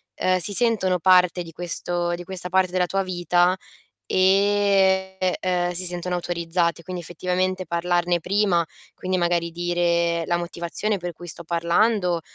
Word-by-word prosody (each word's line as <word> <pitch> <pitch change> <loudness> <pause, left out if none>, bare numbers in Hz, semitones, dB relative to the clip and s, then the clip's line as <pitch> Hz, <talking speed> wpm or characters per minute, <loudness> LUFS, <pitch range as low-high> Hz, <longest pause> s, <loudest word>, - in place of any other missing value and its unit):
ehm, 185 0 +1
si 175 +4 +2
sentono 200 -5 +2
parte 180 -1 +4
di 165 -1 -12
questo 175 0 -2
di 175 +1 -6
questa 180 -1 -3
parte 185 0 +2
della 180 -1 +1
tua 195 +2 -1
vita, 175 0 +1 0.5
ehm, 190 0 +2
e 180 -1 0
si 185 +1 -1
sentono 180 0 -3
autorizzate. 170 -1 -1
Quindi 180 0 -6
effettivamente 185 +2 -2
parlarne 175 +1 0
prima, 185 -2 +1 0.3
quindi 185 0 -2
magari 170 -1 0
dire 170 -1 0
la 175 - +1
motivazione 175 +4 -3
per 175 -1 -5
cui 175 +2 -12
sto 170 0 -7
parlando 175 +2 +1
180 Hz, 145 wpm, -23 LUFS, 175-185 Hz, 0.5 s, parte